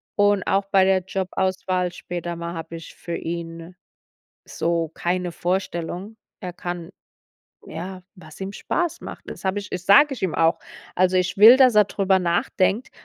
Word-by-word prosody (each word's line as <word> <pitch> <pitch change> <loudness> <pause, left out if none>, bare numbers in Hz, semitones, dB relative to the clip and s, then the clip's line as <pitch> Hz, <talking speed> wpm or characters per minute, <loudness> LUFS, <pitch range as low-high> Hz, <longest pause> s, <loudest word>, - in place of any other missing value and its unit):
und 205 -2 +3
auch 195 0 +2
bei 190 -1 +4
der 190 -1 +3
Jobauswahl 185 -1 -1
später 175 -1 -5
mal 170 0 -5
hab 165 0 -7
ich 165 -1 -9
für 170 -1 -6
ihn 165 +1 -6 0.7
so 165 -1 -1
keine 180 0 -2
Vorstellung. 180 +3 -3 0.2
Er 180 -3 -6
kann 175 -1 -6 0.8
ja, 185 +3 -7
was 165 -2 -15
ihm 190 +1 -4
Spaß 345 - -2
macht. - - -9
Das - - -10
hab 190 +1 0
ich 205 -1 -5
das 180 0 -5
sag 270 +9 +7
ich 255 - -7
ihm 185 -4 -1
auch. 165 0 +3 0.4
Also 185 0 +3
ich 185 0 0
will, 225 +5 +9
dass 255 -4 +5
er 210 - +7
drüber 195 -1 +1
nachdenkt, 185 +5 0
185 Hz, 165 wpm, -23 LUFS, 170-195 Hz, 0.8 s, will